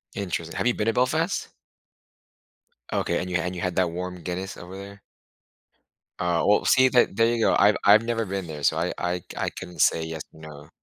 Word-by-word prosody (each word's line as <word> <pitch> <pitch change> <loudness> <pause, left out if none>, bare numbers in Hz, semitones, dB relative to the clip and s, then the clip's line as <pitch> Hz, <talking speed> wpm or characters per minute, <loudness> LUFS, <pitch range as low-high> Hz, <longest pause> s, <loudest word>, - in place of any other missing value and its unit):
Interesting, 85 -4 -4
have - - 0
you 125 - +3
been 105 - -1
to 115 - +2
Belfast? 155 - 0 1.4
Okay, - - 0
and 90 - -4
you 90 - +1
and 90 +2 -3
you 90 - -5
had 90 -1 -2
that 90 -2 +3
warm 90 0 -6
Guinness 90 +3 -5
over 90 +2 -10
there? 100 +1 -10 1.2
Oh, 85 -1 0
well, 105 - +3
see 130 +1 +5
that 125 -6 +3
there 115 - +4
you 115 - -2
go, - - +3
I've 105 +1 +5
I've 105 +2 +6
never 115 -1 -1
been 95 -2 -4
there, 75 -2 -7
so 80 - +2
I 85 +2 -1
I 90 0 -1
c - - -22
I - - -1
couldn't 90 -2 -7
say 80 - +3
yes 80 -1 -5
or - - -16
no. 75 -2 -11
90 Hz, 215 wpm, -25 LUFS, 85-105 Hz, 1.4 s, I've